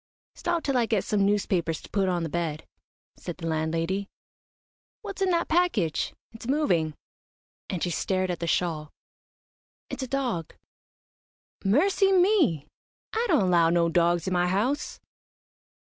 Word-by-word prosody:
"Stop 345 Hz, -2 st, -2 dB
till 275 Hz, -2 st, +1 dB
I 235 Hz, -2 st, +2 dB
get 215 Hz, -4 st, +1 dB
some 205 Hz, -2 st, +1 dB
newspapers 185 Hz, -5 st, 0 dB
to -, -, -13 dB
put 195 Hz, -2 st, +1 dB
on 175 Hz, -2 st, 0 dB
the -, -, -1 dB
bed," 160 Hz, -1 st, -3 dB, 0.5 s
said 175 Hz, -, -7 dB
the 165 Hz, -, -7 dB
landlady 165 Hz, +5 st, -1 dB, 0.9 s
"what's 395 Hz, -2 st, -7 dB
in 380 Hz, -, +3 dB
that 340 Hz, -1 st, +1 dB
package? 315 Hz, -, +1 dB, 0.2 s
It's 225 Hz, +1 st, -10 dB
moving," 180 Hz, -, +1 dB, 0.7 s
and 180 Hz, -, -3 dB
she 175 Hz, -, 0 dB
stared 185 Hz, +2 st, 0 dB
at 175 Hz, -, -4 dB
the 170 Hz, -, -3 dB
shawl. 160 Hz, -4 st, 0 dB, 1.0 s
"It's -, -, -4 dB
a 260 Hz, -, -3 dB
dog." 245 Hz, -, -2 dB, 1.1 s
"Mercy 380 Hz, -, +3 dB
me! 360 Hz, -, +3 dB, 0.5 s
I 455 Hz, +2 st, +1 dB
don't 305 Hz, -, +4 dB
allow 175 Hz, -3 st, +4 dB
no 170 Hz, 0 st, +3 dB
dogs 170 Hz, 0 st, +2 dB
in 190 Hz, -, -1 dB
my 180 Hz, 0 st, +2 dB
house." 225 Hz, +11 st, -1 dB
190 Hz, 145 wpm, -27 LUFS, 170-275 Hz, 1.1 s, don't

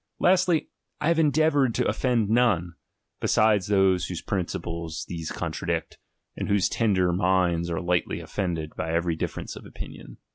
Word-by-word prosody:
Lastly, 180 Hz, -3 st, +3 dB, 0.3 s
I 150 Hz, -, +1 dB
have 170 Hz, -1 st, +3 dB
endeavoured 145 Hz, -4 st, +3 dB
to 125 Hz, -, +1 dB
offend 120 Hz, -5 st, +1 dB
none, 105 Hz, -7 st, +2 dB, 0.5 s
beside 110 Hz, -2 st, +3 dB
those 95 Hz, -3 st, +3 dB
whose 90 Hz, -, -5 dB
principles 85 Hz, -3 st, -3 dB
these 80 Hz, -2 st, -5 dB
contradict, -, -, -3 dB, 0.4 s
and -, -, -4 dB
whose 100 Hz, -1 st, +3 dB
tender 95 Hz, -6 st, +2 dB
minds 90 Hz, -2 st, +1 dB
are 85 Hz, -, -1 dB
lightly 90 Hz, -1 st, 0 dB
offended 85 Hz, -6 st, -3 dB
by 80 Hz, -, -3 dB
every 85 Hz, 0 st, 0 dB
difference 80 Hz, -, -4 dB
of -, -, -10 dB
opinions. -, -, -10 dB
95 Hz, 145 wpm, -26 LUFS, 85-120 Hz, 0.5 s, Lastly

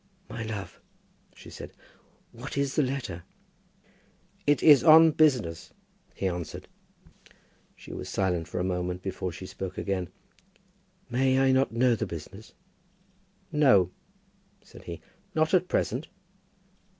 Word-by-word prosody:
"My 115 Hz, -, -5 dB
love," 110 Hz, -3 st, -6 dB, 0.5 s
she -, -, -13 dB
said, -, -, -9 dB, 0.6 s
"what 125 Hz, +4 st, -8 dB
is 140 Hz, -1 st, 0 dB
the -, -, +4 dB
letter?" 125 Hz, -, -3 dB, 1.2 s
"It 145 Hz, -3 st, +3 dB
is 145 Hz, -5 st, +8 dB
on 160 Hz, 0 st, +8 dB
business," 125 Hz, -, +1 dB, 0.4 s
he 95 Hz, -, -1 dB
answered. 90 Hz, -2 st, -5 dB, 1.1 s
She -, -, -11 dB
was -, -, -6 dB
silent 90 Hz, -4 st, -1 dB
for 85 Hz, -, -4 dB
a -, -, 0 dB
moment 90 Hz, 0 st, -2 dB
before 95 Hz, -1 st, -3 dB
she 90 Hz, +3 st, -9 dB
spoke 95 Hz, 0 st, -7 dB
again. 95 Hz, -3 st, -2 dB, 1.0 s
"May 130 Hz, +2 st, +2 dB
I 135 Hz, 0 st, +4 dB
not 130 Hz, +1 st, +2 dB
know 120 Hz, +2 st, +3 dB
the 110 Hz, -1 st, -3 dB
business?" 95 Hz, +6 st, -9 dB, 1.0 s
"No," 130 Hz, -, +4 dB, 0.7 s
said -, -, -15 dB
he; 85 Hz, -1 st, -7 dB, 0.3 s
"not 155 Hz, +2 st, +1 dB
at 185 Hz, -1 st, +3 dB
present." -, -, -1 dB
110 Hz, 125 wpm, -27 LUFS, 90-135 Hz, 1.2 s, is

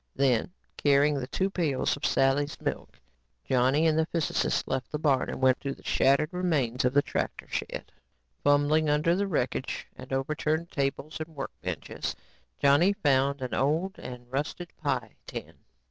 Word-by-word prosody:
Then 130 Hz, +2 st, +2 dB, 0.3 s
carrying 145 Hz, 0 st, +3 dB
the 125 Hz, -, -4 dB
two 190 Hz, +7 st, -1 dB
pails 155 Hz, -8 st, 0 dB
of 140 Hz, -, -1 dB
Sally's 140 Hz, +2 st, +2 dB
milk, -, -, -4 dB, 0.5 s
Johnny 130 Hz, +5 st, +3 dB
and 160 Hz, -1 st, +3 dB
the 160 Hz, -, +2 dB
physicist 165 Hz, -2 st, 0 dB
left 130 Hz, -1 st, -2 dB
the 150 Hz, -, -1 dB
barn 140 Hz, -4 st, +2 dB
and -, -, -4 dB
went 130 Hz, -1 st, +4 dB
to 140 Hz, -1 st, -3 dB
the -, -, -19 dB
shattered 140 Hz, +3 st, +3 dB
remains 150 Hz, -10 st, 0 dB
of 125 Hz, +2 st, +1 dB
the 145 Hz, -, +5 dB
tractor -, -, -3 dB
shed. -, -, -4 dB, 0.5 s
Fumbling 145 Hz, +2 st, +3 dB
under 150 Hz, +3 st, +3 dB
wrecked 140 Hz, -9 st, -2 dB
and -, -, -11 dB
overturned 155 Hz, +4 st, -1 dB
tables 140 Hz, +2 st, -2 dB
and 160 Hz, 0 st, -7 dB
workbenches, 135 Hz, -2 st, -5 dB, 0.4 s
Johnny 145 Hz, +8 st, +5 dB
found 140 Hz, -7 st, +2 dB
an 125 Hz, -, -4 dB
old 165 Hz, +9 st, 0 dB
and 125 Hz, -1 st, -8 dB
rusted 150 Hz, +5 st, -3 dB
pie 130 Hz, -8 st, -2 dB
tin. -, -, -7 dB
145 Hz, 155 wpm, -28 LUFS, 135-155 Hz, 0.5 s, the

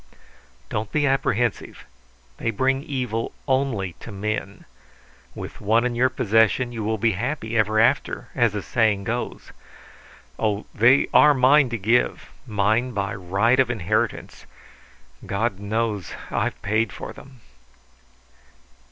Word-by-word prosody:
"Don't 105 Hz, 0 st, -3 dB
be 150 Hz, -1 st, +1 dB
apprehensive. 120 Hz, -4 st, -1 dB, 0.5 s
They -, -, -2 dB
bring 130 Hz, +4 st, +1 dB
evil 125 Hz, -6 st, -3 dB
only 130 Hz, -9 st, 0 dB
to 115 Hz, -, -10 dB
men. 100 Hz, 0 st, -4 dB, 0.7 s
With -, -, -8 dB
one 115 Hz, +4 st, +2 dB
in 125 Hz, -, 0 dB
your 125 Hz, +2 st, +2 dB
possession 115 Hz, 0 st, +2 dB
you 115 Hz, -2 st, -5 dB
will 110 Hz, +1 st, -1 dB
be 115 Hz, +2 st, +2 dB
happy 115 Hz, +2 st, -3 dB
ever 110 Hz, 0 st, +2 dB
after, 115 Hz, -, +1 dB
as 120 Hz, -3 st, +2 dB
the 105 Hz, -2 st, -4 dB
saying 110 Hz, -4 st, +1 dB
goes. 120 Hz, +5 st, -4 dB, 0.9 s
Oh, 105 Hz, -1 st, -1 dB
they 120 Hz, +5 st, +5 dB
are 150 Hz, -1 st, +7 dB
mine 135 Hz, +1 st, +5 dB
to 120 Hz, -, -3 dB
give; 115 Hz, +5 st, 0 dB, 0.2 s
mine 110 Hz, +4 st, +1 dB
by 100 Hz, -2 st, -2 dB
right 100 Hz, +7 st, +1 dB
of 130 Hz, -2 st, +3 dB
inheritance. 110 Hz, -8 st, -2 dB, 0.8 s
God 100 Hz, 0 st, -2 dB
knows 105 Hz, -1 st, -2 dB, 0.2 s
I -, -, +1 dB
paid 110 Hz, +1 st, -1 dB
for -, -, -8 dB
them!" 130 Hz, -3 st, -15 dB
115 Hz, 130 wpm, -23 LUFS, 105-125 Hz, 0.9 s, are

